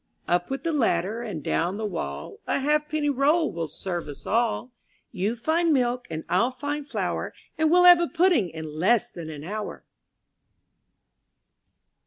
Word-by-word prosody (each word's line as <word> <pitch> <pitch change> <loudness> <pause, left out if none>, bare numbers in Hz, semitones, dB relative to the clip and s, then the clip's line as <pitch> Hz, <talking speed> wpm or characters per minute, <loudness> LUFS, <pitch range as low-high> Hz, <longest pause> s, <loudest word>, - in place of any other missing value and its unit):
| - - -48
Up 175 0 +1
with 270 0 -4
the 335 - 0
ladder 225 - +1
and 200 -11 -5
down 175 +4 0
the 220 - -3
wall, 70 - -5
A - - +1
halfpenny 300 +1 +1
roll 295 +5 +2
will 165 -1 -3
serve 175 +2 -4
us 140 -1 -9
all. 235 +2 0 0.4
You 205 +6 -1
find 320 +7 +1
milk 250 -3 +1
and 160 0 -4
I'll 185 +8 +2
find 285 +3 -4
flour, - - -2 0.2
And 315 0 +2
we'll 355 +2 +5
have 355 -1 +9
a 340 - +1
pudding 335 - +3
in 160 0 -7
less 205 +4 +3
than 165 -2 -8
an 150 -2 -8
hour. 210 +5 -5
235 Hz, 165 wpm, -25 LUFS, -, 0.4 s, have